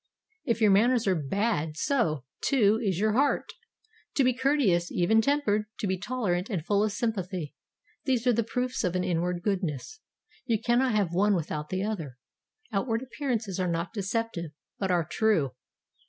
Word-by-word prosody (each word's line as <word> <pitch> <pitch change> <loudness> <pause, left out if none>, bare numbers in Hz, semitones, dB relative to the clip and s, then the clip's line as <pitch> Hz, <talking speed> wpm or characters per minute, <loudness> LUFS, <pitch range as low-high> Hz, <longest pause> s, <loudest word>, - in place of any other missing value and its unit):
If 230 -4 0
your 210 -2 +6
manners 235 +4 +4
are 195 - +3
bad, 160 0 -1
so, 230 - +1 0.2
too, 220 -6 +3
is 190 -5 0
your 215 +1 +2
heart. 280 +4 +1 0.6
To 275 - +4
be 255 0 +3
courteous, 240 -10 +2
even 220 +6 +3
tempered, 220 -6 +1
to 220 - -3
be 190 -1 +1
tolerant 200 -5 -1
and 180 -8 -3
full 200 +3 +2
of 215 - +1
sympathy, 190 -7 -3 0.5
these 255 -3 +1
are 245 - +4
the 230 - +2
proofs 250 +3 -2
of 180 0 0
an 180 - +1
inward 175 0 -1
goodness. 190 - -2 0.5
You 225 -3 +2
cannot 240 +1 +2
have 195 -5 +1
one 200 +3 +3
without 150 -3 -3
the 185 +1 -1
other. 165 - -4 0.5
Outward 225 +3 0
appearances 235 -7 -3
are 185 - +1
not 170 +4 -2
deceptive, 200 -5 -3 0.3
but 195 - -1
are 175 -3 +2
true. 170 - +1
205 Hz, 170 wpm, -28 LUFS, 175-235 Hz, 0.6 s, your